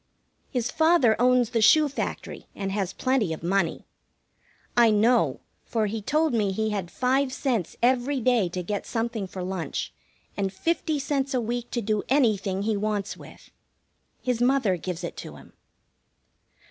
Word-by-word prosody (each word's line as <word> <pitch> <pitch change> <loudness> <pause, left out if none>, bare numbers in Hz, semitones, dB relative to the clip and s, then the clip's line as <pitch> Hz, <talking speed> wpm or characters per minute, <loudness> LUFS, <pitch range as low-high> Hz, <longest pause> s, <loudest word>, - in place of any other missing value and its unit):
His 245 -3 -2
father 315 -8 +4
owns 250 -2 +3
the 230 - +1
shoe 305 +7 +6
factory, 285 - -5
and 195 -1 -3
has 195 -2 -1
plenty 250 -7 0
of 155 - -8
money. 180 -1 0 0.9
I 235 -1 +6
know, 220 +3 +3 0.2
for 225 -2 -1
he 215 +1 -3
told 305 +6 +1
me 210 -4 +1
he 220 +2 -1
had 195 -4 -3
five 260 +5 +1
cents 245 - -2
every 255 +2 +2
day 235 -6 +2
to 180 +1 -4
get 205 +2 -4
something 225 -3 -2
for 185 0 -6
lunch, 180 - -4 0.4
and 195 -1 -1
fifty 315 - -1
cents 275 -1 -1
a - - +2
week 240 +1 -3
to 240 - -2
do 215 0 0
anything 210 -8 +2
he 220 0 0
wants 205 -1 -2
with. - - -15 0.7
His 250 -2 -1
mother 245 -6 +3
gives 180 0 -5
it 170 - -5
to - - -8
him. - - -15
225 Hz, 160 wpm, -26 LUFS, 195-255 Hz, 0.9 s, shoe